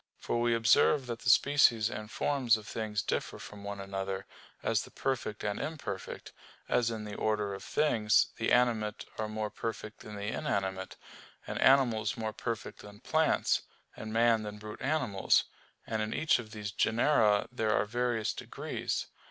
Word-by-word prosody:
For 120 - -1
we 120 0 +3
observe 115 +4 +4
that 120 -2 -5
the 120 - -1
species 120 -6 +5
and 110 -2 -6
forms 125 -3 +2
of 110 - -11
things 110 -2 -3
differ - - -2
from 105 -1 -10
one 100 0 -5
another, 95 0 -4 0.4
as - - +2
the - - -10
perfect 120 -5 -3
and 105 -1 -1
imperfect; 145 -12 -5 0.3
as 120 -2 +2
in 110 -2 -4
the 105 -1 -7
order 105 -1 0
of 95 - -7
things, 110 -8 +3
the 115 - 0
animate 115 -4 +2
are 110 - -1
more 110 0 -3
perfect 110 -1 -5
than 105 - -9
the 100 0 -5
inanimate, 95 -6 -2 0.5
and - - -4
animals 120 -6 +4
more 110 -1 -3
perfect 115 0 -5
than 105 0 -12
plants, 160 +2 +2 0.3
and 110 0 -7
man 115 0 +4
than 105 -1 -6
brute 105 0 -9
animals; 130 -10 +2 0.4
and 110 -1 -2
in 110 0 -2
each 155 0 +3
of 110 -3 -7
these 105 -2 -5
genera 110 -2 +3
there 115 -3 -1
are - - +2
various 120 0 0
degrees. - - -4
110 Hz, 170 wpm, -31 LUFS, 105-120 Hz, 0.5 s, species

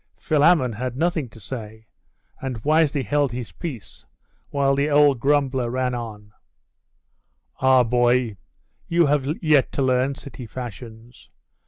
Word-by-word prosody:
Philammon 150 -5 +3
had 125 +3 -4
nothing 160 -4 0
to 110 - -15
say; 110 -1 -8 0.6
and 125 -5 -5
wisely 150 -2 +2
held 145 +3 0
his 120 -6 -6
peace, 130 - -8 0.5
while 140 -1 +1
the 140 +2 +1
old 145 -3 +4
grumbler 135 -2 +1
ran 125 0 -1
on 105 -3 -7 1.3
'Ah, 130 -1 +5
boy, 120 -1 +2 0.5
you 170 0 +3
have 145 -2 +1 0.2
yet 150 -4 +3
to 140 - 0
learn 130 +1 +1
city 130 -3 -10
fashions! 115 0 -10
130 Hz, 130 wpm, -23 LUFS, 120-145 Hz, 1.3 s, Ah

